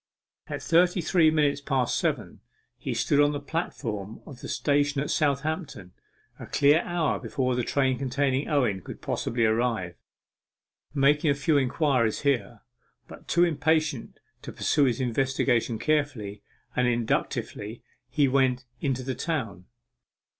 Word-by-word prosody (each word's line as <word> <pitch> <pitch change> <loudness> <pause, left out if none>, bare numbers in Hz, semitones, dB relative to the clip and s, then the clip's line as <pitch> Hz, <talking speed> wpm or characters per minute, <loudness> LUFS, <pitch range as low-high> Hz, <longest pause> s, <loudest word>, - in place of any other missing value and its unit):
At - - -5
thirty 175 +2 +3
three 170 -1 +4
minutes 145 -2 +1
past 135 -3 0
seven - - -2 0.4
he - - -4
stood 145 - +2
on 145 0 +4
the 145 - -3
platform 115 - -4
of 135 -5 -11
the - - -7
station 145 -1 +1
at 140 - -2
Southampton 145 - -1 0.5
a - - -8
clear 145 +3 +4
hour 175 -4 -1
before 125 +2 -1
the 125 - 0
train 130 +1 0
containing 135 +1 0
Owen 125 -10 +1
could - - -9
possibly 115 -1 -1
arrive. 110 -5 0 1.0
Making 145 +2 +3
a 140 - +3
few 150 +2 +1
inquiries 130 -4 +1
here, 125 -5 -1 0.5
but - - -13
too 175 - +3
impatient 155 -4 0 0.2
to - - -8
pursue 145 -2 +2
his 125 -2 0
investigation 125 -2 0
carefully 130 -8 -1 0.3
and 125 0 +2
inductively, 115 -2 -2 0.3
he 140 +2 +2
went 130 -1 +1
into 130 -1 -1
the 130 +1 -3
town. 125 - -3
135 Hz, 140 wpm, -26 LUFS, 120-150 Hz, 1.0 s, three